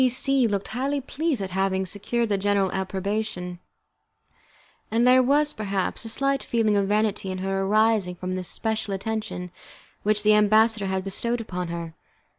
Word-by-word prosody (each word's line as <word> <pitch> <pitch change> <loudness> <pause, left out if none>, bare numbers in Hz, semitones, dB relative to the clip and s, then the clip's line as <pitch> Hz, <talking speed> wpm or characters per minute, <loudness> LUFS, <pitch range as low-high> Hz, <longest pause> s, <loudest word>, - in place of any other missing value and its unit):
C 255 - +5
C 260 0 +3
looked 200 -2 -2
highly 270 +5 -1
pleased 275 -3 -2
at 190 - -5
having 190 0 0
secured 230 +4 -1
the 205 - +2
general 200 -1 +1
approbation, 190 -1 -3 1.3
and 230 +2 +2
there 255 +1 +6
was, 290 +3 +2
perhaps, 200 -3 -2
a - - -4
slight 275 +3 0
feeling 225 -3 +1
of 200 -1 +2
vanity 210 -1 0
in 185 - -3
her 195 +1 -1
arising 210 -2 +2
from 185 +1 -4
the 185 0 -3
special 215 +2 -2
attention 215 -3 -4 0.5
which 210 0 +1
the 215 0 +5
ambassador 215 0 +4
had 190 0 -1
bestowed 230 +4 -1
on 180 -1 -3
her. 170 -1 -5
210 Hz, 165 wpm, -25 LUFS, 190-230 Hz, 1.3 s, there